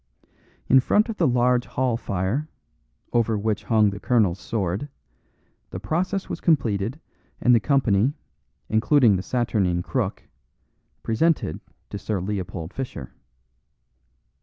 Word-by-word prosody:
In 130 - +6
front 210 - +2
of 220 - -4
the 165 - +3
large 125 0 +2
hall 130 -2 0
fire, 115 +7 -2 0.6
over 115 -2 +2
which 105 0 -2
hung 110 -3 +3
the 100 - -7
colonel's 105 -7 +2
sword, 100 +5 -3 0.8
the 90 - -6
process 180 - -2
was - - -5
completed 120 - +1 0.4
and 125 - +4
the 115 - +6
company, 130 -1 +2 0.5
including 115 0 +4
the 90 - -1
saturnine 100 -7 0
Crook, - - -2 0.8
presented 115 - +1 0.3
to 100 - -5
Sir 105 -2 -2
Leopold 90 -3 -4
Fischer. 125 - -6
115 Hz, 120 wpm, -24 LUFS, 100-130 Hz, 0.8 s, In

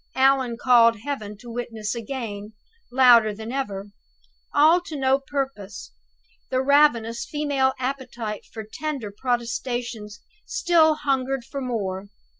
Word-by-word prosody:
Allan 265 -3 +3
called 230 -3 +5
Heaven 215 -6 -5
to 235 +2 -11
witness 225 -3 -4
again, 220 -3 -6 0.4
louder 240 -4 +6
than 220 +2 -7
ever. 205 -7 -4 0.6
All 315 +5 +5
to 330 -3 -8
no 265 0 +2
purpose! 270 -8 -5 0.6
The 255 - +1
ravenous 260 -5 +3
female 285 -3 0
appetite 250 -5 -4
for 220 - -6
tender 260 -1 -5
protestations 240 -3 -3 0.2
still 340 -9 +3
hungered 270 -3 -1
for 275 +1 -6
more. 200 -6 -3
250 Hz, 115 wpm, -24 LUFS, 220-275 Hz, 0.6 s, louder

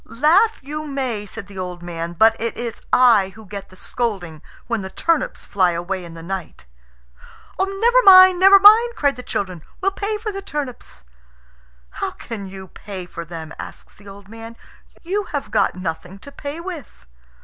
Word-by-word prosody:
"Laugh 340 - +2
you 305 +2 -5
may," 255 -7 -3
said 225 0 -8
the 200 -1 -10
old 180 -1 -6
man; 170 0 -5
"but 220 +6 +4
it 230 0 -2
is 235 -1 -5
I 220 -7 +4
who 220 - -13
get 200 0 -8
the 185 - -16
scolding 185 -8 -4 0.2
when 230 -3 -2
the 190 - -6
turnips 330 - -1
fly 185 -3 +1
away 180 +2 -4
in 170 -1 -10
the 165 - -10
night." 180 - -6 0.9
"Never 415 +6 +3
mind! 370 -2 +9
never 390 +1 +8
mind!" 450 +4 +7
cried 285 -6 +1
the 250 - -8
children. 185 -8 -4 0.2
"We'll 390 +1 +1
pay 415 +2 -3
for 430 0 -4
the 395 0 -6
turnips." 280 - -7 0.9
"How - - -3
can 210 -4 -8
you 190 -1 -10
pay 190 -1 -8
for 170 -1 -8
them?" 160 -1 -8
asks - - -10
the 205 - -18
old 195 0 -12
man. 225 +1 -11 0.5
"You 395 +4 -2
have 285 -9 -5
got 215 - +1
nothing 180 +1 -6
to 280 - -13
pay 285 +3 -7
with." 335 - -9
225 Hz, 180 wpm, -20 LUFS, -, 0.9 s, mind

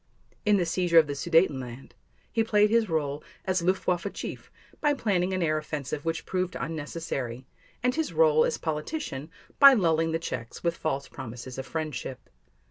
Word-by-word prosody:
In 210 -1 +6
the 180 - +1
seizure 170 0 +2
of 160 - +8
the 145 - -3
Sudetenland, 140 -6 +1 0.4
he 225 - +2
played 210 -1 +3
his 230 -3 +3
role 150 -2 -1 0.2
as 185 -1 +1
Luftwaffe 180 +1 0
chief - - -6 0.3
by 295 -1 +2
planning 190 -7 +1
an 185 -1 0
air 155 -1 +1
offensive 145 -2 -4
which 165 0 -2
proved 185 -1 -2
unnecessary, 145 -6 -4 0.4
and 250 0 +3
his 320 +1 -1
role 475 -1 +5
as 485 0 0
politician 155 - -4 0.3
by 275 -1 +10
lulling 165 -5 +2
the 165 - +1
Czechs 125 -8 -6
with 170 -1 +1
false 140 -4 -2
promises 125 +2 -8
of 130 - -6
friendship. 145 -3 -5
165 Hz, 165 wpm, -27 LUFS, 145-190 Hz, 0.4 s, by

